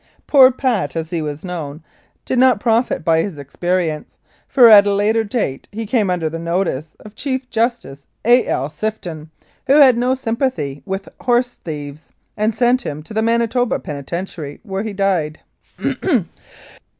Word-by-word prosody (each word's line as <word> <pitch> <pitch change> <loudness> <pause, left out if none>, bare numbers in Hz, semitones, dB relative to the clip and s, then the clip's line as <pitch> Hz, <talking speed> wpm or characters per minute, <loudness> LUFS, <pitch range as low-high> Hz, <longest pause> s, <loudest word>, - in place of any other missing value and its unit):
Poor 265 -3 +7
"Pat," 250 -8 -1
as 160 -1 -4
he 170 -2 -1
was 150 +2 -5
known, 160 -4 -6 0.4
did 255 - 0
not 255 -4 +5
profit 230 -7 +1
by 160 -1 +3
his 180 -4 -5
experience, 160 +2 -2 0.3
for 250 -4 +6
at 205 -2 +8
a 200 - +2
later 215 +3 +2
date 205 - -3
he 225 +2 -5
came 215 -3 +1
under 175 -3 0
the 165 +1 -5
notice 170 -3 -2
of 215 -2 -12
Chief 260 0 -3
Justice 225 - -2 0.2
A. 245 +2 +5
L. 135 - -1
Sifton, 165 -4 -5 0.4
who 280 +3 +5
had 260 -5 +7
no 250 +2 +2
sympathy 225 - -2
with 195 0 -4
horse 245 0 +1
thieves, 150 -1 -7 0.3
and 215 +1 0
sent 245 +2 +2
him 150 -8 -6
to 215 - -11
the 220 - +1
Manitoba 235 +1 +1
Penitentiary, 150 0 -6
where 195 -3 -4
he 220 0 -4
died. 190 -6 -1
200 Hz, 160 wpm, -19 LUFS, 160-240 Hz, 0.4 s, at